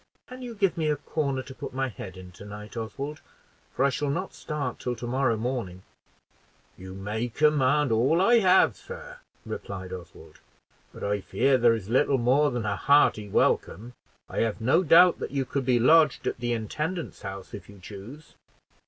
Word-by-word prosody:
"Can 255 +1 -10
you 240 -2 -7
give 195 -4 +1
me 155 -1 +1
a 150 - +2
corner 140 -2 -2
to 130 - -10
put 130 - -8
my 135 0 0
head 95 -4 -9
in 90 -1 -11
to 90 - -13
night, 105 +2 -10
Oswald? 135 +7 -5 0.5
for 135 - +2
I - - +4
shall 140 +3 -2
not 180 +7 -3
start 150 -2 -4
till 125 -1 -3
to 120 - -7
morrow 125 -1 +1
morning." 110 -6 -4 0.9
"You 95 +1 -10
may 105 +5 -3
command 145 0 +2
all 125 +9 +3
I 235 +5 +5
have, 190 -2 +4
sir," - - -10 0.3
replied 95 -2 -6
Oswald; 85 -3 -11 0.5
"but - - -10
I 100 0 -1
fear 135 +7 +2
there 115 -1 +5
is 105 -4 -7
little 130 +4 +2
more 130 +5 +3
than 120 -4 -3
a 105 -1 0
hearty 125 -7 +3
welcome; 115 +4 0 0.3
I - - -4
have 115 -2 0
no 125 +9 +3
doubt 180 +1 +6
that - - -4
you 135 -1 -2
could 135 0 -3
be 125 -2 +3
lodged 155 +3 +4
at - - -2
the 120 0 -2
intendant's 155 - -4
house 95 -1 -8
if 100 - -9
you 100 - -13
choose." 105 - -11
125 Hz, 190 wpm, -26 LUFS, 105-150 Hz, 0.9 s, doubt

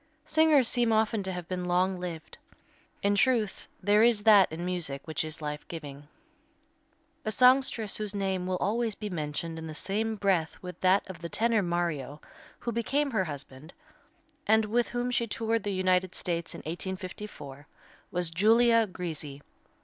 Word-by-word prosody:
Singers 310 -5 +4
seem 240 -2 +2
often 220 0 +2
to 190 -1 -3
have 180 -2 -6
been 180 -1 -3
long 180 +1 +1
lived. 165 -3 -7 0.6
In 200 0 +3
truth, 215 -1 +1 0.2
there 205 +2 +4
is 225 -3 +4
that 205 -5 +6
in 165 +2 -5
music 170 -7 -3
which 160 -1 -2
is 155 0 -6
life 150 0 -5
giving. 145 -3 -8 1.2
A 215 - -2
songstress 250 -3 +4
whose 210 -1 -4
name 190 -2 -1
will 185 0 0
always 225 +2 0
be 210 -1 -6
mentioned 160 0 -4
in 160 - -7
the 155 - -7
same 215 +6 -2
breath 190 -6 0
with 180 -1 -9
that 190 +2 +3
of 185 -3 -8
the 170 0 -6
tenor 225 +2 +2
Mario, 170 -6 -2 0.4
who 235 - -4
became 270 +5 0
her 205 -6 +1
husband, 145 0 -8 0.7
and 220 0 +4
with 235 +3 0
whom 245 +1 -2
she 235 -1 0
toured 225 +1 -1
the 205 - -3
United 185 -1 +1
States 170 -1 -2
in - - -8
1854, 175 -4 -7 0.4
was 175 -2 -1
Giulia 225 +5 +4
Grisi. 155 -6 -6
190 Hz, 165 wpm, -29 LUFS, 165-220 Hz, 1.2 s, that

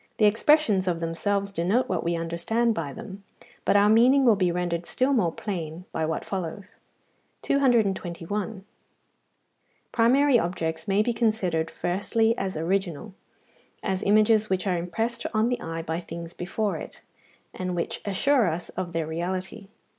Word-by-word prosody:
The 215 - +4
expressions 215 -3 +3
of 170 -2 0
themselves 200 +5 -1
denote 195 +8 +1
what 185 - -1
we 170 0 0
understand 170 +8 0
by 160 -7 -4
them, 195 +7 -9 0.4
but - - +3
our 205 0 +6
meaning 250 +5 +5
will 230 -3 +6
be 185 -3 +1
rendered 175 -1 -2
still 260 +2 +1
more 185 -10 +2
plain 170 -3 -5
by 160 - -1
what 160 - -3
follows. 190 +1 -5 0.7
221. 205 -6 0 1.3
Primary 250 +3 +4
objects 160 -3 -3
may 200 +1 +3
be 240 - 0
considered 185 -9 0
firstly 220 +7 0
as 190 -7 -3
original, 185 +2 -2 0.7
as 190 -2 -1
images 215 +1 +4
which 190 +1 0
are 185 -2 +1
impressed 225 +7 -2
on 220 +2 +3
the 245 - -2
eye 165 0 -4
by 160 +1 -2
things 170 -1 -8
before 190 +1 -2
it, - - -10 0.5
and 185 -1 -3
which 170 - -3
assure 230 +4 +2
us 170 +1 -3
of 180 -2 -5
their 165 -1 -1
reality. 185 +5 -4
190 Hz, 150 wpm, -26 LUFS, 170-220 Hz, 1.3 s, our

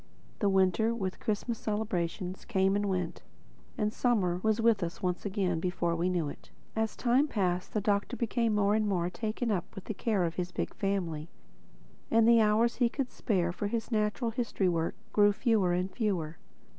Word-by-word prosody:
The 205 - +2
Winter, 195 +4 +3
with 190 -5 -3
Christmas 220 +2 -2
celebrations, 190 -3 -2
came 195 -3 +1
and 205 0 0
went, 180 -2 -2 0.6
and 210 0 0
Summer 195 -10 +1
was 220 +1 +1
with 225 -3 +3
us 170 +1 -4
once 180 +2 -1
again 190 -4 0
before 175 -1 -1
we 170 +2 0
knew 175 -4 0
it. 145 - -9 0.3
As 220 -1 -1
time 255 +4 +3
passed 185 -7 -1
the 215 - +2
Doctor 205 +4 0
became 230 -1 0
more 205 0 +3
and 215 0 +2
more 180 -3 0
taken 225 +3 -2
up 180 -4 -3
with 195 - -7
the - - -4
care 205 -1 0
of 165 -1 -2
his 180 -1 -2
big - - -3
family; 175 -6 -2 0.8
and 225 0 +4
the 230 -1 +7
hours 220 +2 +3
he 245 -2 +3
could 265 0 -3
spare 180 -5 0
for 200 +3 -3
his 225 +3 -3
natural 215 +2 0
history 225 -5 -1
work 165 -2 0 0.2
grew 205 -1 +5
fewer 205 -4 +2
and 180 +2 0
fewer. 175 -9 -1
205 Hz, 185 wpm, -30 LUFS, 180-220 Hz, 0.8 s, the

